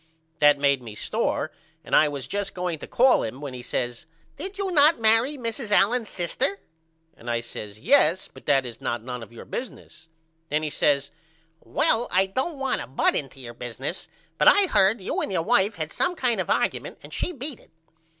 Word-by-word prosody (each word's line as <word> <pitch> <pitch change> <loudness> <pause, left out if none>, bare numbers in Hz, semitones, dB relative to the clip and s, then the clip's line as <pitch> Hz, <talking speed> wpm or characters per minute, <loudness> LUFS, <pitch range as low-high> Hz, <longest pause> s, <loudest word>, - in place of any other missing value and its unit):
That 145 -1 +6
made 140 -2 +2
me 110 -3 -9
sore - - -1 0.3
and - - 0
I 155 - +6
was 140 -3 -5
just 200 +4 -3
going 180 -3 -3
to - - -8
call 255 +1 +4
him 120 +4 -5
when 140 -3 -6
he 125 - -7
says 120 +1 -4 0.3
Did 390 +1 -7
not 335 -6 +5
you - - -20
marry 225 +6 +3
Mrs. 230 -1 -4
Allen's 215 +3 +3
sister? 180 +3 -1 0.6
And 120 - -9
I 120 0 +1
says 105 -3 -8
Yes 190 - +3
but - - -17
that 135 -3 +3
is 120 -2 -8
not 120 -1 -2
none 125 0 -6
of 115 - -11
your 120 - -11
business. 240 -9 -8 0.4
Then 150 +2 0
he 155 - -2
says 140 -1 +1 0.5
Well 235 +7 +1
I 185 +2 +3
don't 260 - -3
want 270 -1 -1
to - - -7
butt 130 - +2
into 135 -1 -4
your 120 -2 -9
business 125 - -6 0.3
but - - +4
I 405 - +7
heard 200 - +3
you 185 - -2
and - - -2
your 175 -4 0
wife 210 -1 +3
had 155 -1 -4
some 360 - 0
kind 250 -7 +1
of - - -6
argument - - 0
and - - -11
she - - -2
beat 280 -4 -6
it. - - -22
175 Hz, 205 wpm, -25 LUFS, -, 0.6 s, I